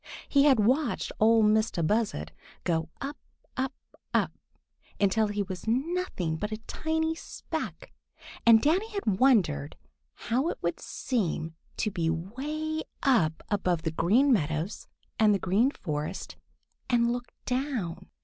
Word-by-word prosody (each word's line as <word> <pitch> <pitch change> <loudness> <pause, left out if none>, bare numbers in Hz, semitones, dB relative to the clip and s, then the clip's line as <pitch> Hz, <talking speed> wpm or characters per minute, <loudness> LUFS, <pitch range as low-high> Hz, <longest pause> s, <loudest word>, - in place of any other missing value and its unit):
He 280 0 +4
had 270 -5 +6
watched 255 +5 +1
Ol' 225 +1 +5
Mistah 215 -4 +2
Buzzard 205 - 0 0.3
go 165 -2 0
up, 285 +2 -4 0.4
up, 265 +1 -1 0.4
up, - - +2 0.7
until 210 +2 +3
he 205 0 -1
was 185 -3 -7
nothing 255 - -1
but 210 +5 -3
a 215 - -2
tiny 320 0 -1
speck, 325 - -6 0.5
and 230 -1 +7
Danny 370 +9 +2
had 215 - -1
wondered 200 - +3 0.4
how 260 +8 0
it - - -3
would - - -1
seem 165 - -2 0.2
to 215 - 0
be 165 -3 0
way 290 - -3 0.2
up 170 - +3
above 180 -5 +1
the 160 - -1
Green 235 - +4
Meadows 160 -1 -1 0.3
and 215 -2 +5
the - - +2
Green 195 +7 +2
Forest 150 - -4 0.5
and 235 -1 +3
look 245 0 -5
down. 250 - -2
220 Hz, 135 wpm, -28 LUFS, 175-270 Hz, 0.7 s, and